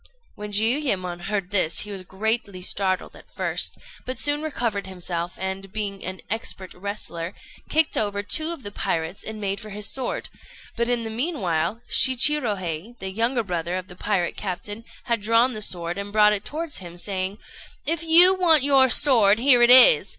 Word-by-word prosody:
When 210 0 -8
Jiuyémon 205 -6 -1
heard 200 -3 -3
this 185 -5 +1
he 210 - -8
was 195 -2 -7
greatly 200 0 -3
startled 190 0 0
at - - -17
first, - - -2 0.3
but 255 - -5
soon 290 +1 +1
recovered 235 -10 -3
himself, 175 -2 -5
and 190 +1 -5
being 200 -2 -4
an 185 0 -6
expert 200 -4 -4
wrestler, 180 -3 -6 0.3
kicked 315 0 +2
over 205 -1 -1
two 315 +9 0
of 335 -6 -6
the 205 - -6
pirates, 165 -2 -3
and 220 0 -7
made 200 -1 -3
for 215 - -10
his 210 0 -4
sword; 260 -2 -3 0.5
but 235 0 -1
in 240 -1 0
the 225 - -6
meanwhile 220 - -2
Shichirohei, 235 - +2
the 190 -2 -6
younger 230 +4 0
brother 175 -2 -3
of 185 +1 -8
the 180 - -12
pirate 180 -2 -2
captain, 205 +3 -6 0.2
had 235 -4 -1
drawn 230 +4 +2
the 215 - -6
sword, 175 -2 -1
and 200 0 -6
brought 210 0 +4
it 205 -1 -3
towards 315 0 -5
him, 175 -2 -11
saying 190 +1 -3 0.5
"If 330 +1 0
you 335 +3 +9
want 335 -6 +3
your 270 -2 +4
sword, 230 -8 +4
here 250 0 +4
it 240 - +5
is!" 260 - +7
210 Hz, 180 wpm, -23 LUFS, 190-245 Hz, 0.5 s, you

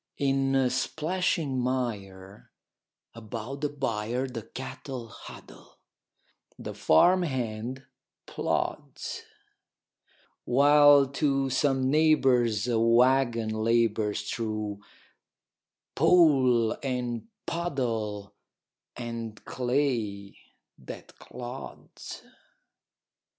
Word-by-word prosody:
In 135 -1 +2
splashing 155 0 -1
mire 105 -7 -4 0.6
about 115 +4 -7
the 150 - 0
byre 125 -3 -2
The 125 -3 -6
cattle 130 0 -8
huddle, - - -13 0.8
the - - -7
farm 180 - +4
hand 130 -3 -3 0.4
plods; - - -3 1.2
While 145 +2 +6
to 135 -1 0
some 135 -1 +1
neighbor's 130 -8 +3
a 115 -2 +1
wagon 120 0 +3
labors 110 -2 +1
Through 110 -3 -3 1.1
pool 130 -10 +4
and 125 - -3 0.2
puddle 115 - -3 0.6
and 115 -2 -6
clay 120 -6 -1 0.4
that - - -11
clods. 125 +2 -9
125 Hz, 70 wpm, -27 LUFS, 110-135 Hz, 1.2 s, While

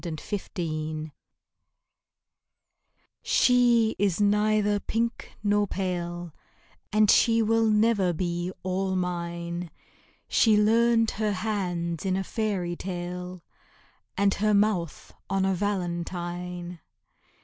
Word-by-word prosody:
Witch 160 -3 -7 0.3
Wife 155 -2 -3 2.1
She 240 -3 +3
is 195 -3 +1
neither 210 0 +2
pink 230 +3 -3
nor 205 0 +2
pale, 175 -3 -4 0.6
And 215 0 +5
she 230 -1 +4
never 220 -2 +3
will 175 - +1
be 175 +1 -2
all 190 +1 -1
mine; 170 -1 -3 0.6
She 220 -2 +4
learned 225 +1 +3
her 215 -1 -1
hands 180 -5 -2
in 190 -1 0
a 195 - -1
fairy 190 -5 -2
tale, 180 0 -6 0.7
And 200 -1 +3
her 210 +1 +1
mouth 200 -6 0 0.2
on 195 0 +1
a 195 - +2
valentine. 175 -2 -3
190 Hz, 100 wpm, -26 LUFS, 175-210 Hz, 2.1 s, And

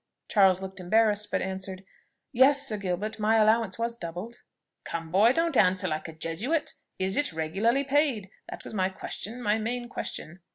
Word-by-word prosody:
Charles 190 -3 +4
looked 190 0 -7
embarrassed, 210 +3 +2
but - - -1
answered 190 0 -5 0.5
"Yes, 280 +2 +4
Sir 215 - 0
Gilbert, 200 +3 -3
my 215 +1 +3
allowance 220 -2 +3
was 230 0 -2
doubled." 180 +4 -7 0.4
"Come 165 -1 -5
boy, 205 +6 +5
don't 330 +2 0
answer 185 -2 +3
like 155 -1 -3
a 160 - -8
Jesuit. 180 - -2 0.2
Is 190 +1 0
it 290 - +1
regularly 195 - +1
paid? 275 -8 +1 0.2
That - - -8
was - - -9
my 190 -3 +1
question, 220 +5 -6
my 210 0 +2
main 240 +2 -3
question." 170 -6 -5
210 Hz, 170 wpm, -27 LUFS, 185-235 Hz, 0.5 s, boy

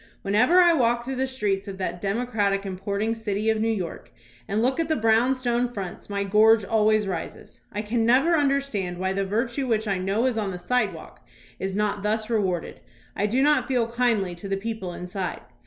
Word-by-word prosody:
Whenever 230 - +3
I 350 -1 +6
walk 240 -4 +1
through 265 0 -4
the 265 +1 0
streets 205 -6 -1
of 195 -1 -6
that 175 -2 -4
democratic 205 -2 0
importing 200 +3 -2
city 220 -1 -1
of 220 -1 -1
New 225 - +1
York 190 -7 -4 0.4
and 205 +2 -1
look 255 +6 +1
at 325 -1 0
the 315 - +2
brownstone 240 +1 +2
fronts 195 -5 -7
my 200 -1 -1
gorge 215 +2 +5
al 215 0 +2
ways 215 -1 +3
rises. 175 -4 -6
I 210 +1 -3
can 225 +2 0
never 265 +9 +4
understand 275 - 0
why 190 +1 -1
the 195 0 -1
virtue 235 +6 -1
which 220 -2 0
I 195 -2 0
know 195 +6 0
is 245 -4 +1
on 205 -2 -1
the 180 - -5
sidewalk 180 - -2 0.4
is 190 0 -3
not 210 -1 0
thus 215 +2 -1
rewarded. 190 -6 -1 0.4
I 205 - 0
do 250 +6 +1
not 295 -3 +3
feel 240 -3 0
kindly 230 -7 +1
to 175 +3 -8
the 195 0 -1
people 205 -3 -4
inside. 180 +2 -5
215 Hz, 200 wpm, -25 LUFS, 195-240 Hz, 0.4 s, I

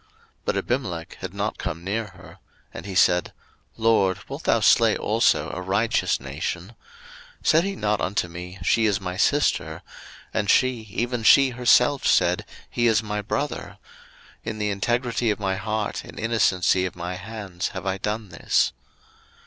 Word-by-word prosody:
01:020:004 - - -34 0.4
But - - 0
Abimelech - - -3
had - - -6
not - - -2
come 85 - -4
near 105 +4 -2
her: - - -15 0.3
and 80 - -8
he 95 - -6
said, 90 -1 +3 0.4
LORD, 110 -5 +3
wilt - - -7
thou - - +3
slay - - +4
also - - +1
a 90 - -4
righteous 100 +5 +1
nation? 75 +7 -5 0.7
01:020:005 - - -21
Said 160 +2 +5
he 195 0 -3
not 105 - 0
unto 90 +2 0
me, 90 +2 -8
She 115 -1 +3
is 100 -1 +1
my 90 -2 -5
sister? 80 - +1 0.5
and 105 -2 -1
she, 125 -3 +2
even 120 +3 -2
she 135 +4 +6
herself 125 +3 +3
said, 90 0 +3 0.2
He 120 0 0
is 110 -1 +3
my 105 -1 -3
brother: 105 +8 -4 0.7
in 110 -1 -4
the 105 -1 -1
integrity 120 +3 0
of 105 - -1
my 95 -2 -1
heart 110 0 -3
and - - -11
innocency 95 -5 +2
of 90 - -9
my 90 +1 -5
hands 95 -2 -5
have - - -7
I 95 0 -1
done 105 +1 -3
this. 85 - +1
105 Hz, 165 wpm, -24 LUFS, 90-115 Hz, 0.7 s, she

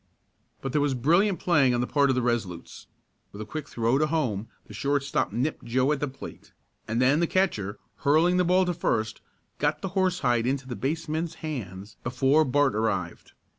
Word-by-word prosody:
But 135 - -3
there 150 - +1
was 145 -2 +1
brilliant 170 - +2
playing 140 -8 +3
on 120 - 0
the - - 0
part 140 +1 +2
of 130 - +2
the 125 - 0
Resolutes. 110 -8 -3 0.4
With 100 - -11
a 110 - -5
quick 150 +6 -6
throw 120 +3 +1
to 155 - +2
home 120 -10 -1 0.2
the - - -13
shortstop 140 +6 0
nipped 130 +6 -2
Joe 130 +4 +1
at 150 - 0
the 145 - -1
plate, 135 0 -11 0.3
and 115 +2 -1
then 135 +4 +4
the 170 - +2
catcher, 110 - 0 0.2
hurling 160 +5 +3
the 180 - +3
ball 180 +2 +3
to 180 - 0
first, 110 -10 -1 0.4
got - - 0
the 195 - -2
horsehide 180 - +1
into 135 0 -1
the 125 - -5
baseman's 160 +4 -2
hands 105 -8 -6
before 135 +5 +3
Bart 145 +1 +2
arrived. 100 -5 -2
135 Hz, 190 wpm, -26 LUFS, 120-155 Hz, 0.4 s, then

